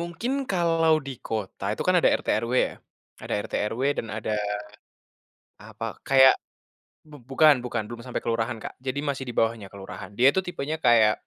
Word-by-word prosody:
mungkin 170 +8 -4 0.2
kalau 165 -3 +3
di - - -4 0.2
kota 110 -4 -4
itu - - -3
kan 185 - +4
ada - - +5
RT/RW 115 +3 -1
ya. - - -10 0.5
Ada - - -3
RT/RW 110 +4 -2 0.2
dan - - -2
ada, 110 0 -4 1.4
apa, 110 +1 -8 0.2
kayak 135 -1 +8 0.8
bu 150 - -12
bukan 150 +3 +6
bukan, 125 -2 -2
belum 120 +1 -8
sampai 125 - -4
kelurahan, 115 +1 -1
Kak. - - -6
Jadi 130 +2 -2
masih 135 -1 -2
di 120 - -4
bawahnya 115 -3 +1
kelurahan. 100 -1 -9
Dia 125 - +6
itu 190 - 0
tipenya 155 -3 -3
kayak 110 -2 +6
125 Hz, 165 wpm, -25 LUFS, 115-155 Hz, 1.4 s, kayak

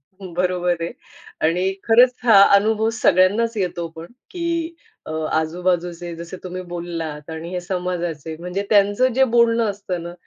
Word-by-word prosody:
हं. 185 +5 -13
बरोबर 180 -1 0
आहे. 170 - -3 0.5
आणि 175 +3 +1 0.2
खरंच 245 +2 +6
हा 215 -4 +7
अनुभव 220 +2 +3
सगळ्यांनाच 210 +6 +3
येतो 175 -3 -2
पण, 165 +1 -8 0.2
की 335 -1 -3 0.3
अ, - - -5 0.2
आजूबाजूचे 175 +1 -1
जसे 170 +2 -8
तुम्ही 185 0 -5
बोललात 165 -3 -5
आणि 160 +1 -6
हे 180 -1 -3
समाजाचे, 175 -4 -4
म्हणजे 180 +3 -3
त्यांचं 205 +5 +3
जे 265 0 +5
बोलणं 235 -1 +3
असतं 190 -4 -5
ना 170 0 -7
180 Hz, 145 wpm, -21 LUFS, 170-215 Hz, 0.5 s, हा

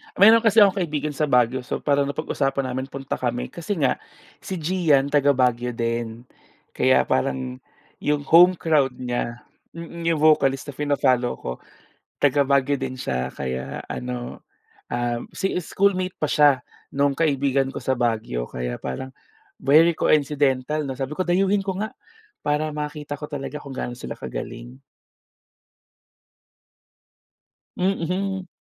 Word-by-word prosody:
Mayroon 225 +3 +8
kasi 225 -1 +6
akong 200 0 +3
kaibigan 150 -4 -2
sa 150 +1 -1
Baguio. 125 -1 +3
So 125 - -5
parang 140 -1 +2
napag-usapan 140 -2 -1
namin 130 +1 -3
punta 135 0 -5
kami. 120 -1 -2
Kasi 175 +4 -4
nga 140 -7 +1 0.4
si 190 - -5
Gian 155 -5 +2
taga-Baguio 125 -4 +2
din. 115 0 -3 0.5
Kaya - - +3
parang, 65 -1 -1 0.4
'yong 145 -1 0
home 175 +4 +7
crowd 150 -6 +1
niya, 120 -1 -4 0.3
mm. 170 0 -6
'Yong 165 - +3
vocalist 145 -3 +3
na - - -17
fina-follow 130 -4 +1
ko. - - -6 0.7
Taga-Baguio 140 0 +3
din 130 -1 -4
siya 65 - -3
kaya 65 -1 -4
ano, 125 -1 -6 0.5
um, 120 0 -1
si 190 - -1
schoolmate 185 +1 0
pa 155 - +1
siya 145 -4 +4 0.3
no'ng 140 0 +1
kaibigan 140 -3 +1
ko - - -5
sa 130 -1 0
Baguio. 110 - -1
Kaya 60 -1 -4
parang 130 - -5 0.5
very 160 +4 +4
coincidental, 145 0 +1
'no? 135 - -3
Sabi 135 +3 -5
ko 185 - 0
dayuhin 195 +2 +2
ko 190 0 -2
nga 215 - -2 0.6
para 150 +1 +1
makita 150 -1 -5
ko 150 - -6
talaga 145 -1 -5
kung 140 -2 -9
gaano 120 -1 -5
sila - - -6
kagaling. - - -7 3.0
Mhm. 190 +1 -1
140 Hz, 135 wpm, -23 LUFS, 125-160 Hz, 3.0 s, Mayroon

